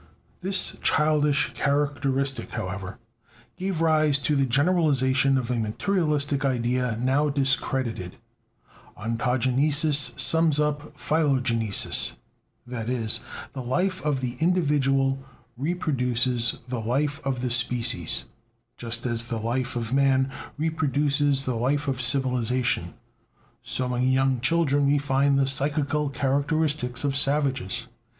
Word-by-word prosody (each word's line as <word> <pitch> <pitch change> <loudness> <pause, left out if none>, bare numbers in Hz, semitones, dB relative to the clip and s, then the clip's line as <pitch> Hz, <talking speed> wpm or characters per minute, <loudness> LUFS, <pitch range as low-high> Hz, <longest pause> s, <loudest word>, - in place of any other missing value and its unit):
This 190 +1 +1
childish 150 -1 +2
characteristic, 140 -2 -1
however, 95 +1 -6 0.6
gave 185 -3 -3
rise 155 -3 +3
to 145 +3 0
the 135 -1 +1
generalization 135 -2 +2
of 125 -1 -2
a 120 - -1
materialistic 145 - -1
idea 125 -2 -1
now 135 +4 +1
discredited: 130 -8 -1 0.8
"Ontogenesis 130 +6 +2
sums 160 -2 +4
up 150 0 -2
philogenesis": 130 -10 +1 0.5
that 120 -2 -5
is, 115 -3 0 0.3
the 135 - -5
life 180 +10 -1
of 145 -3 -1
the 125 -1 -4
individual 140 -6 +1 0.4
reproduces 125 -6 0
the 125 -1 -4
life 140 +7 -1
of 135 -3 -2
the 125 -1 -2
species; 120 -7 +1 0.5
just 115 0 -5
as 115 -1 0
the 115 -1 -4
life 120 +3 -2
of 115 0 -3
man 135 -1 +2 0.3
reproduces 145 -3 +1
the 130 - -1
life 140 +5 -1
of 130 -2 -1
civilization, 125 -2 +1 0.7
so 125 -1 -2
in 125 +1 0
young 130 -1 +1
children 145 0 +1
we 145 +1 +3
find 140 0 +1
the 135 - +2
psychical 145 +2 +1
characteristics 140 -1 -1
of 140 -1 -1
savages. 135 -5 0
135 Hz, 115 wpm, -25 LUFS, 125-145 Hz, 0.8 s, sums